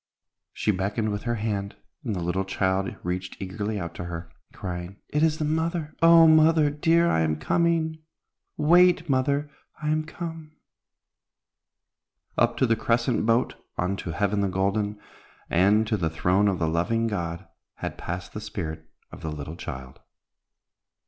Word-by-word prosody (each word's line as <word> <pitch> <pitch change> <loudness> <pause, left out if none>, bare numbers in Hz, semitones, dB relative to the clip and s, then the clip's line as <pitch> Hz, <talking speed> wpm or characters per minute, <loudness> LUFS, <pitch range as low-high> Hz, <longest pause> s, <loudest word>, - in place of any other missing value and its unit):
She 105 - 0
beckoned 105 +3 -1
with 105 +2 -4
her 120 -1 0
hand, 105 -2 -3 0.3
and 115 -6 -2
the 90 - -3
little 90 +3 0
child 95 0 -1
reached 90 +1 -4
eagerly 100 +2 -3
out 85 -2 -5
to 90 - -6
her, 85 -1 -6 0.2
crying, 90 0 -6
"It 150 - 0
is 160 -1 +3
the 155 - -1
mother! 160 0 -1
Oh, 165 0 +8
mother, 155 -1 +5
dear, 165 +3 +3
I 80 - +2
am 80 -1 +1
coming! 160 - +1 0.6
Wait, 175 +3 +5
mother! 140 +2 +1 0.3
I 150 +1 -2
am 155 0 +1
com 165 -2 -7 1.0
" - - -51
Up 120 0 +3
to 130 - +3
the 115 -2 +3
Crescent 115 +1 +1
Boat 115 +2 +2 0.2
on 90 +2 0
to 90 - -6
Heaven 100 +3 0
the 100 - +1
Golden, 100 +2 -1 0.5
and 100 +5 +4
to 110 0 0
the 80 -4 0
throne 90 +5 +2
of 95 -2 +1
the 80 - 0
loving 90 +8 +1
God, 85 -5 -3 0.3
had - - -6
passed 90 +1 -5
the 105 - -5
spirit 80 -7 -5 0.3
of - - -10
the 80 - -4
little 75 +1 -6
child. 65 -4 -8
105 Hz, 160 wpm, -26 LUFS, 90-150 Hz, 1.0 s, Oh